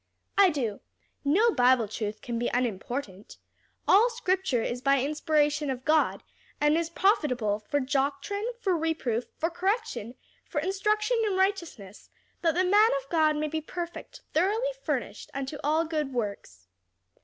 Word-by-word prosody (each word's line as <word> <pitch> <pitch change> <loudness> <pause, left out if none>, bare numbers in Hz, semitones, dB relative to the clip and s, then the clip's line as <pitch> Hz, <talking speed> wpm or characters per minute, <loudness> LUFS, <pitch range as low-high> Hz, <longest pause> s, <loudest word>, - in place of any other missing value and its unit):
"I 400 -2 +6
do; 245 -10 -2 0.4
no 395 +12 +4
Bible 250 - +4
truth 215 0 -5
can 235 -1 -3
be 240 - 0
unimportant. 230 -3 -3 0.5
'All 440 +5 +6
scripture 380 - 0
is 245 +1 -3
by 275 0 +3
inspiration 300 +1 +1
of 255 -1 -4
God, 310 +1 +2 0.4
and 295 +1 +3
is 330 0 0
profitable 255 - +1
for 250 +7 -1
doctrine, 280 - -1
for 385 -6 +1
reproof, 310 -8 -1
for 330 +2 -1
correction, 375 - -2 0.3
for 295 - -3
instruction 425 +7 +1
in 385 -2 0
righteousness: 340 - -2 0.3
that 330 -2 +2
the 365 - +3
man 415 +4 +5
of - - -24
God 310 -2 +3
may 305 +1 -1
be 315 +1 -3
perfect, 345 +2 -7
thoroughly 430 +9 +1
furnished - - -3
unto 275 +2 -4
all 310 +3 +2
good 305 -4 -2
works.' 200 - -5
305 Hz, 145 wpm, -28 LUFS, 250-375 Hz, 0.5 s, I